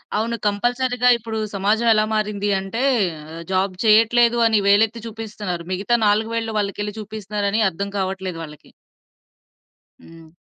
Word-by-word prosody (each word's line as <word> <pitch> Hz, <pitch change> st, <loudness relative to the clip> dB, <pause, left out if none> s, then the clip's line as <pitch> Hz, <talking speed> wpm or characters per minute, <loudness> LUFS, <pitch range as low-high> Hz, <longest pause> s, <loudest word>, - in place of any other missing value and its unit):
అవును. 230 Hz, +2 st, -1 dB
కంపల్సరీగా. 245 Hz, +4 st, +1 dB
ఇప్పుడూ 225 Hz, -1 st, -6 dB, 0.2 s
సమాజం 215 Hz, +4 st, +1 dB
ఎలా 215 Hz, 0 st, +2 dB
మారింది 210 Hz, -1 st, -1 dB
అంటే, 210 Hz, +6 st, -4 dB, 0.5 s
ఆహ్, 165 Hz, -, -7 dB
జాబ్ 190 Hz, 0 st, +1 dB
చెయ్యట్లేదు 230 Hz, +2 st, +4 dB
అని 220 Hz, -2 st, +3 dB
వేలెత్తి 220 Hz, +3 st, +3 dB
చూపిస్తన్నారు. 210 Hz, -6 st, -6 dB
మిగతా 200 Hz, +6 st, +1 dB
4 215 Hz, +2 st, +1 dB
వేళ్ళు 225 Hz, -1 st, -2 dB
వాళ్ళకెళ్లి 205 Hz, +1 st, -3 dB
చూపిస్తున్నారని 210 Hz, 0 st, -2 dB
అర్థం 200 Hz, +3 st, -5 dB
కావట్లేదు 190 Hz, -2 st, -3 dB
వాళ్ళకి. 150 Hz, -1 st, -12 dB, 1.3 s
హ్మ్. 165 Hz, -1 st, -15 dB
210 Hz, 125 wpm, -21 LUFS, 195-225 Hz, 1.3 s, చెయ్యట్లేదు